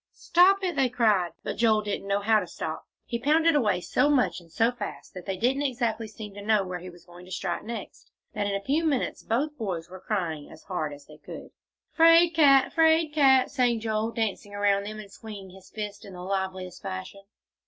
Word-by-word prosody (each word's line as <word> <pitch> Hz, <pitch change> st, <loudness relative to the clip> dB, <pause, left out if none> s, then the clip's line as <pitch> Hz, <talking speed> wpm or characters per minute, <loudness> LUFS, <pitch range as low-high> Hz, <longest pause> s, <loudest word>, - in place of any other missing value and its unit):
"Stop 385 Hz, +3 st, +4 dB
it!" 360 Hz, -3 st, -1 dB
they 270 Hz, -2 st, +2 dB
cried. 215 Hz, -8 st, +2 dB
But -, -, -4 dB
Joel 220 Hz, -1 st, +3 dB
didn't 205 Hz, -1 st, -4 dB
know 200 Hz, 0 st, 0 dB
how 215 Hz, +1 st, +4 dB
to 180 Hz, -, -5 dB
stop; 160 Hz, -1 st, -6 dB, 0.2 s
he 235 Hz, -, -3 dB
pounded 320 Hz, +6 st, +3 dB
away 210 Hz, -11 st, +2 dB
so 290 Hz, -, +1 dB
much 195 Hz, -, +1 dB
and 165 Hz, -1 st, -20 dB
so 230 Hz, +6 st, +2 dB
fast, 245 Hz, -4 st, -8 dB
and 180 Hz, -, -7 dB
they 190 Hz, -1 st, -2 dB
didn't 255 Hz, +7 st, +1 dB
exactly 235 Hz, -5 st, -1 dB
seem 210 Hz, -1 st, -9 dB
to 205 Hz, -, -9 dB
know 210 Hz, -1 st, +2 dB
where 180 Hz, -1 st, -5 dB
he 180 Hz, +1 st, -9 dB
was 175 Hz, -1 st, -16 dB
going 175 Hz, 0 st, -14 dB
to 185 Hz, -, -14 dB
strike 175 Hz, -2 st, -3 dB
next, 225 Hz, -2 st, -8 dB, 0.2 s
that 205 Hz, -1 st, -1 dB
in 200 Hz, -, -1 dB
a 200 Hz, -, -4 dB
few 300 Hz, +5 st, +1 dB
minutes 295 Hz, -5 st, -1 dB
both 285 Hz, +7 st, -1 dB
boys 180 Hz, -6 st, -4 dB
were 185 Hz, -, -9 dB
crying 170 Hz, -8 st, -3 dB
as 160 Hz, -, -14 dB
hard 165 Hz, -6 st, -3 dB
as 145 Hz, 0 st, -11 dB
they 150 Hz, -, -15 dB
could. -, -, -10 dB, 0.4 s
"'Fraid 330 Hz, +1 st, +6 dB
cat! 275 Hz, -4 st, +5 dB
'Fraid 320 Hz, -1 st, +3 dB
cat!" 265 Hz, -4 st, +4 dB
sang 245 Hz, -4 st, +1 dB
Joel, 220 Hz, 0 st, -1 dB
dancing 210 Hz, -3 st, -3 dB
around 200 Hz, -1 st, +1 dB
them, 215 Hz, +1 st, -6 dB
and 210 Hz, -2 st, -10 dB
swinging 200 Hz, -4 st, -10 dB
his 190 Hz, 0 st, -16 dB
fists 205 Hz, -1 st, -6 dB
in 195 Hz, -, -11 dB
the 180 Hz, 0 st, -8 dB
liveliest 190 Hz, -1 st, -4 dB
fashion. 95 Hz, -, -6 dB
215 Hz, 215 wpm, -27 LUFS, 185-260 Hz, 0.4 s, Fraid